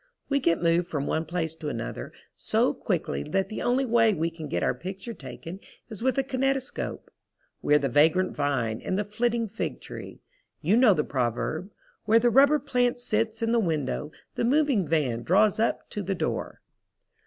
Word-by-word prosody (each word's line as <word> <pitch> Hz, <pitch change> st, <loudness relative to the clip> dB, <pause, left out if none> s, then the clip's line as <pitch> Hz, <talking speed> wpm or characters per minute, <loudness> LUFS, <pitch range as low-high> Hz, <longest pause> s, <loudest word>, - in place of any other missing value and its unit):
We 280 Hz, 0 st, +2 dB
get 170 Hz, -9 st, +1 dB
moved 170 Hz, +1 st, +3 dB
from 145 Hz, -5 st, -2 dB
one 160 Hz, -, -1 dB
place 160 Hz, -1 st, -2 dB
to 160 Hz, -2 st, -5 dB
another 115 Hz, -, -5 dB, 0.2 s
so -, -, +1 dB
quickly 70 Hz, -, -2 dB
that 195 Hz, -, -1 dB
the 215 Hz, -, -5 dB
only 255 Hz, +2 st, +2 dB
way 225 Hz, -3 st, +4 dB
we 165 Hz, +1 st, -1 dB
can 165 Hz, -2 st, -7 dB
get -, -, -1 dB
our -, -, +2 dB
picture 190 Hz, -, -7 dB
taken 180 Hz, -3 st, -9 dB, 0.3 s
is 215 Hz, -, -8 dB
with 260 Hz, +1 st, +1 dB
a 270 Hz, -, +3 dB
kinetoscope. 270 Hz, 0 st, -2 dB, 0.5 s
We 150 Hz, -, +3 dB
are -, -, +8 dB
the 140 Hz, -2 st, 0 dB
vagrant 160 Hz, +8 st, +3 dB
vine 125 Hz, -6 st, -1 dB
and 185 Hz, -, -2 dB
the 210 Hz, -, +1 dB
flitting 230 Hz, +2 st, 0 dB
fig 220 Hz, +3 st, -4 dB
tree. -, -, -9 dB, 0.4 s
You 210 Hz, -, +2 dB
know 235 Hz, -5 st, +6 dB
the 150 Hz, -, +1 dB
proverb: 135 Hz, -, -2 dB, 0.4 s
"Where 220 Hz, +2 st, +5 dB
the 240 Hz, +1 st, +3 dB
rubber 280 Hz, +4 st, +6 dB
plant 250 Hz, -4 st, 0 dB
sits 225 Hz, -1 st, -1 dB
in 225 Hz, -, +1 dB
the 235 Hz, -, +3 dB
window 155 Hz, -, -1 dB, 0.2 s
the -, -, -2 dB
moving 265 Hz, -, +2 dB
van 140 Hz, -7 st, 0 dB
draws 200 Hz, -, +3 dB
up 225 Hz, -, 0 dB
to 210 Hz, -, -3 dB
the 195 Hz, 0 st, -2 dB
door." -, -, -3 dB
195 Hz, 190 wpm, -27 LUFS, 155-235 Hz, 0.5 s, are